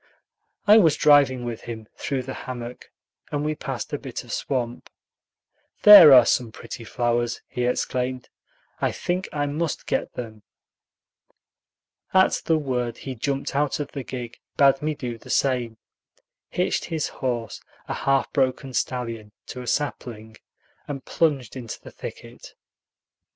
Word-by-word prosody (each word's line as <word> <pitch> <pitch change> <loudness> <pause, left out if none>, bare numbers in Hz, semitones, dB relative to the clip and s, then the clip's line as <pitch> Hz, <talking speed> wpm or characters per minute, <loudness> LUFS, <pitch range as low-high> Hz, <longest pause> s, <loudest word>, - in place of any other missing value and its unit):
I 210 +2 +8
was 165 -7 +4
driving 140 -4 +4
with 120 -2 -5
him 110 -2 -8
through 130 0 -3
the 135 +1 -6
hammock, 125 -1 -7 0.4
and 145 0 -1
we 155 - 0
passed - - -5
a - - -1
bit - - -6
of - - -11
swamp. 120 -3 -3 0.9
"There 205 -8 +11
are 125 -3 +9
some 120 -3 +1
pretty 115 - -9
flowers," 120 +1 -1
he 125 - -2
exclaimed; 125 0 -1 0.5
"I - - +1
think 180 +2 -2
I 145 -1 -1
must 150 +2 -2
get - - -2
them." 110 -3 -7 1.7
At 190 0 +4
the 160 - +3
word 125 -5 -2
he 135 - -6
jumped 135 +3 -3
out 145 +1 +1
of 145 - -4
the 140 - -5
gig, 120 -2 -7 0.2
bade 135 -1 +5
me 155 0 -1
do 120 -4 -5
the - - -15
same, 125 -4 0 0.7
hitched - - -1
his 160 -2 -2
horse, 120 -5 -4 0.3
a - - -2
half 135 0 0
broken 130 -1 0
stallion, 115 -5 -3 0.2
to 125 - -6
a 125 - -9
sapling, 115 -7 -3 0.5
and 140 -2 -6
plunged 140 -8 0
into 120 -4 -7
the - - -12
thicket. - - -10
130 Hz, 145 wpm, -24 LUFS, 120-145 Hz, 1.7 s, There